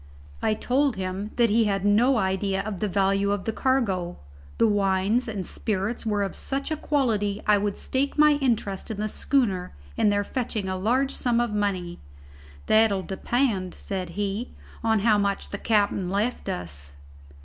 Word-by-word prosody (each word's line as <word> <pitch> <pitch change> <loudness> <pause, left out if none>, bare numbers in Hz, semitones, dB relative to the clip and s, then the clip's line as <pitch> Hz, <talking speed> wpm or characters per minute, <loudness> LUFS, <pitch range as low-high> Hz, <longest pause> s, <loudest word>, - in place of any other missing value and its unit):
I 215 - +1
told 270 +2 +1
him 190 +2 -4
that 235 -3 +3
he 225 +1 +4
had 195 -1 0
no 235 +6 +4
idea 190 -1 0
of 200 -3 -5
the 210 - 0
value 195 +1 +1
of 200 -1 -1
the 225 - 0
cargo. 200 -11 0 0.4
The - - +4
wines 205 +3 +2
and 205 -5 -4
spirits 215 +3 -2
were 205 -1 +1
of 195 - -3
such 275 +2 -3
a - - +1
quality 220 -10 0
I 210 -1 +4
would 205 0 -2
stake 275 +3 -1
my 300 0 +6
interest 215 -7 -1
in 220 - -4
the 210 +1 -1
schooner 205 - 0 0.2
in 210 - +3
their 205 0 +1
fetching 225 -3 -3
a 185 - -2
large 250 +8 +1
sum 240 -2 +1
of 240 -3 0
money. 190 -4 -2 0.7
"That'll 215 -3 +3
depend," 200 -1 -1
said 185 -3 -5
he, 205 +4 -3 0.3
"on 220 -2 +2
how 215 -1 +4
much 200 -1 -1
the 200 - -4
capt'n 200 -4 +1
left 210 +6 -1
us." 75 -5 -6
205 Hz, 170 wpm, -25 LUFS, 195-235 Hz, 0.7 s, my